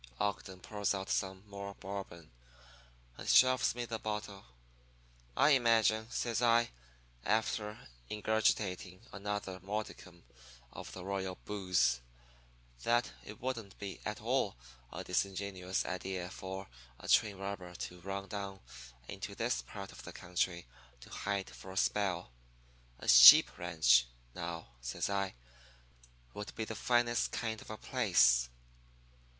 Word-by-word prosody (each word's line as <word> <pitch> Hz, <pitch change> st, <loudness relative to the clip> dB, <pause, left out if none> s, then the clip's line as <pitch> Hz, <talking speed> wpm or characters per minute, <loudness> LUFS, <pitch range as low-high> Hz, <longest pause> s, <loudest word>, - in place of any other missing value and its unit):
"Ogden 95 Hz, -2 st, -2 dB
pours 105 Hz, -1 st, -1 dB
out 95 Hz, 0 st, -4 dB
some 95 Hz, +1 st, -2 dB
more 100 Hz, 0 st, -7 dB
Bourbon, 95 Hz, -4 st, -7 dB, 0.9 s
and -, -, -5 dB
shoves 130 Hz, -1 st, +5 dB
me 120 Hz, 0 st, -3 dB
the 115 Hz, -1 st, -4 dB
bottle. 105 Hz, -2 st, -5 dB, 0.9 s
"'I 150 Hz, -, +6 dB
imagine,' 115 Hz, -4 st, +3 dB
says 120 Hz, -1 st, -1 dB
I, 120 Hz, 0 st, +4 dB, 0.5 s
after 105 Hz, 0 st, -1 dB, 0.2 s
ingurgitating 105 Hz, -4 st, 0 dB
another 100 Hz, -2 st, -4 dB
modicum 95 Hz, -3 st, -6 dB, 0.5 s
of -, -, -8 dB
the 90 Hz, -1 st, -8 dB
royal 95 Hz, -1 st, -2 dB
booze, 90 Hz, -11 st, +1 dB, 0.8 s
'that 120 Hz, -, +2 dB
it 105 Hz, -, -10 dB
wouldn't 115 Hz, -6 st, -4 dB
be 100 Hz, -2 st, -6 dB
at -, -, -4 dB
all -, -, 0 dB, 0.4 s
a -, -, -6 dB
disingenuous 95 Hz, 0 st, -1 dB
idea 90 Hz, 0 st, -4 dB
for 95 Hz, +1 st, -6 dB, 0.3 s
a -, -, -10 dB
train 100 Hz, -2 st, +4 dB
robber 95 Hz, -2 st, -6 dB
to 90 Hz, 0 st, -7 dB
run 100 Hz, +2 st, -5 dB
down 100 Hz, 0 st, -5 dB, 0.5 s
into -, -, -6 dB
this 60 Hz, -, 0 dB
part -, -, -9 dB
of -, -, -11 dB
the -, -, -9 dB
country 85 Hz, 0 st, -2 dB, 0.4 s
to -, -, -13 dB
hide 100 Hz, -1 st, -3 dB
for 95 Hz, -, -11 dB
a 95 Hz, -, -8 dB
spell. 95 Hz, -7 st, 0 dB, 0.7 s
A -, -, -10 dB
sheep -, -, +10 dB
ranch, 70 Hz, -8 st, +4 dB, 0.3 s
now,' 85 Hz, -3 st, -5 dB
says -, -, -2 dB
I, 100 Hz, -4 st, -1 dB, 1.0 s
'would 105 Hz, -, -7 dB
be 110 Hz, -, -2 dB
the 110 Hz, -, -5 dB
finest 120 Hz, +1 st, +1 dB
kind 110 Hz, -2 st, -3 dB
of -, -, -13 dB
a 110 Hz, -, -5 dB
place. 85 Hz, -, +3 dB
100 Hz, 130 wpm, -34 LUFS, 90-110 Hz, 1.0 s, sheep